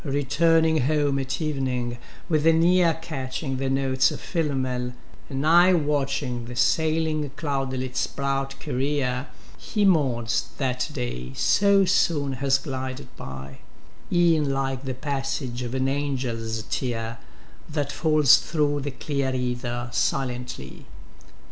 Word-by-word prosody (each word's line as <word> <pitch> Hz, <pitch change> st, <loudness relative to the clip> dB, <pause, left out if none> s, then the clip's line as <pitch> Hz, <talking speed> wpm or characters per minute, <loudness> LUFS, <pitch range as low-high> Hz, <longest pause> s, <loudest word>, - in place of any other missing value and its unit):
Returning 155 Hz, +2 st, +2 dB
home 145 Hz, -2 st, +1 dB
at 135 Hz, +1 st, -3 dB
evening, 130 Hz, -6 st, -2 dB, 0.3 s
with 155 Hz, -2 st, +2 dB
an 165 Hz, 0 st, +5 dB
ear 175 Hz, -2 st, +4 dB
Catching 135 Hz, -3 st, -4 dB
the 135 Hz, 0 st, -1 dB
notes 135 Hz, -1 st, +2 dB
of -, -, -6 dB
Philomel, 130 Hz, -7 st, -2 dB, 0.4 s
an 135 Hz, +1 st, -2 dB
eye 175 Hz, +3 st, +6 dB
Watching 140 Hz, -6 st, 0 dB
the 120 Hz, +1 st, -8 dB
sailing 155 Hz, +3 st, +1 dB
cloudletâs 130 Hz, -4 st, -2 dB
bright 135 Hz, 0 st, -2 dB
career, 135 Hz, -1 st, -1 dB, 0.3 s
He 210 Hz, -3 st, 0 dB
mourns 130 Hz, -11 st, +2 dB
that 125 Hz, +1 st, -1 dB
day 95 Hz, -, -4 dB
so 200 Hz, -1 st, +4 dB
soon 145 Hz, -6 st, +2 dB
has 135 Hz, -1 st, +4 dB
glided 130 Hz, -2 st, -6 dB
by: 65 Hz, 0 st, -8 dB, 0.5 s
Eâen 170 Hz, -4 st, +3 dB
like 135 Hz, -1 st, -2 dB
the 130 Hz, -1 st, -3 dB
passage 135 Hz, -2 st, -3 dB
of 125 Hz, +1 st, -4 dB
an 130 Hz, 0 st, +1 dB
angelâs 125 Hz, -6 st, -2 dB
tear 115 Hz, -2 st, -2 dB, 0.5 s
That 145 Hz, -2 st, -2 dB
falls 155 Hz, -4 st, +5 dB
through 145 Hz, -2 st, 0 dB
the 145 Hz, -, -3 dB
clear 130 Hz, +1 st, -2 dB
ether 120 Hz, -1 st, -2 dB
silently. 125 Hz, -, -2 dB
135 Hz, 125 wpm, -25 LUFS, 125-150 Hz, 0.5 s, eye